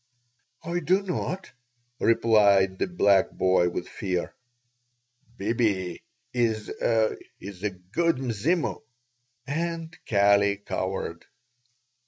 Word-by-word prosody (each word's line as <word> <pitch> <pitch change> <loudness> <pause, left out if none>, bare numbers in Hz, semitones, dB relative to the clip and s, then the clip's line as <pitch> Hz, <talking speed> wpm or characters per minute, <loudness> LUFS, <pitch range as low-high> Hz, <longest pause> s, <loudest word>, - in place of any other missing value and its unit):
"I 170 +2 -2
do 185 +5 +2
not," 190 0 -3 0.5
replied 100 -5 +4
the - - +1
black 100 - +3
boy 95 -1 +2
with 90 - -5
fear. 90 -3 -3 1.0
"Bibi 100 -4 0 0.3
is 115 -3 0 0.7
is 95 -2 -9
a 105 - 0
good 100 - -1
Mzimu." 130 - -1 0.6
And 165 +3 -3
Kali 100 -1 +4
cowered. 95 -3 -4
105 Hz, 90 wpm, -26 LUFS, 95-160 Hz, 1.0 s, replied